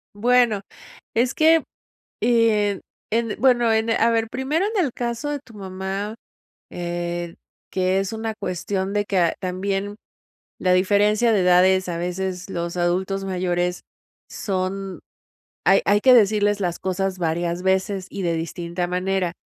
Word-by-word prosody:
Bueno, 235 -1 +3 0.5
es 245 +3 +1
que 320 +1 +5 0.6
en 215 -4 +2 0.3
en 230 -1 0
bueno, 240 -3 +4
en 220 +1 +1
e 225 - +2
a 230 +1 +3
ver. 225 -1 +1
Primero, 290 - -1
en 375 - +3
el 265 - -2
caso 240 +4 -3
de 290 - -2
tu 245 -5 -18
mamá, 195 +2 -5 0.5
eh, 175 0 -4 0.4
que 185 +1 +1
es 195 +3 -3
una 220 0 -3
cuestión 195 0 -3
de 205 0 +1
que, 180 -5 +1
también 195 +2 -3 0.6
la 185 -1 +2
diferencia 205 +5 +3
de 210 - +3
edades 185 +1 +4
a 170 - -3
veces 180 +1 -3
los 170 0 -3
adultos 190 +3 0
mayores 180 -1 -1 0.5
son 190 -1 -3 0.7
hay - - +6
hay 205 +1 +3
que 260 - +7
decirles 205 -2 +4
las 175 -2 -1
cosas 190 0 -2
varias 170 +1 -1
veces 190 0 0
y 200 - -6
de 170 -3 0
distinta 170 +2 -3
manera. 180 0 -1
195 Hz, 145 wpm, -22 LUFS, 180-220 Hz, 0.7 s, que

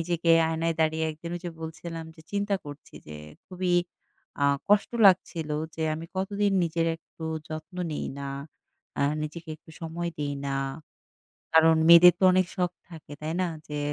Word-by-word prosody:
নিজেকে 170 0 0 0.2
আয়নায় 165 +1 -1
দাঁড়িয়ে 160 0 +1
একদিন 160 +2 -8
ওইযে 175 0 -6
বলছিলাম 165 +1 -6
যে 160 - -16
চিন্তা 200 0 0
করছি 145 0 -11
যে 75 - -9 0.3
খুবই 180 -1 -1 0.7
আ - - +4 0.2
কষ্ট 205 0 +4 0.2
লাগছিল 175 -4 +2 0.2
যে 160 - -4
আমি 160 +1 -7
কতদিন 200 +1 0
নিজের 165 0 0
একটু 165 0 -12 0.2
যত্ন 155 +4 -7 0.2
নেই 150 - -3
না, 140 0 -5 0.7
আ - - +3 0.2
নিজেকে 160 +2 -7
একটু 155 - -19
সময় 170 +1 -4
দেই 145 -1 -2
না। 135 0 -1 1.0
কারণ 160 0 +6
মেয়েদের 170 +1 +10
তো - - -1
অনেক 185 0 +3
শখ 180 -2 0 0.2
থাকে, 160 -4 -12
তাই 155 +1 -3
না? 180 - +1 0.2
যে 150 - -4
165 Hz, 160 wpm, -27 LUFS, 155-180 Hz, 1.0 s, মেয়েদের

